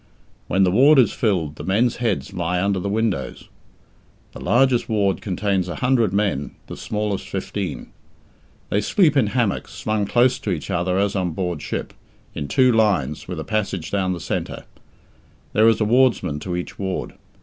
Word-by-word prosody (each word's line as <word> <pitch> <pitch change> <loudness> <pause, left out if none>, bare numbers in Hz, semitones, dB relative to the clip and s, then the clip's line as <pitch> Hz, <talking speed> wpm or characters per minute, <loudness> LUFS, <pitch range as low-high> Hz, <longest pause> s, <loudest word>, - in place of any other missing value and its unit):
When 95 +4 +2
the 90 - +3
ward 140 +9 +6
is 130 - +4
filled, 85 -10 -1
the - - -7
men's 110 +6 +1
heads 110 -4 -2
lie 90 -1 -1
under 100 0 +1
the 100 - -3
windows. 100 - -2 0.8
The - - -10
largest 120 +6 +2
ward 100 -5 +1
contains 95 -1 -1
a - - -4
hundred 125 -5 +2
men, 100 -8 -1
the - - -8
smallest 105 -2 -3
fifteen. 95 -3 -4 0.8
They 105 - +1
sleep 155 - +3
in 130 -6 +3
hammocks, 115 -2 -1
slung 110 -2 -1
close 125 +3 +3
to - - -4
each 90 +1 -3
other 90 +1 0
as 100 +1 +1
on 90 -4 -1
board 90 -3 -3
ship, - - -4 0.4
in 70 - -4
two 130 - +4
lines, 95 - +1
with 90 -3 -5
a - - -3
passage 100 -3 -2
down 95 -2 0
the 90 - -5
centre. - - -4 0.9
There 110 +2 +5
is 115 - +2
a 110 - +2
wardsman 110 - +2
to 90 +3 -4
each 90 - -6
ward. 95 -2 -3
100 Hz, 175 wpm, -22 LUFS, 90-110 Hz, 0.9 s, ward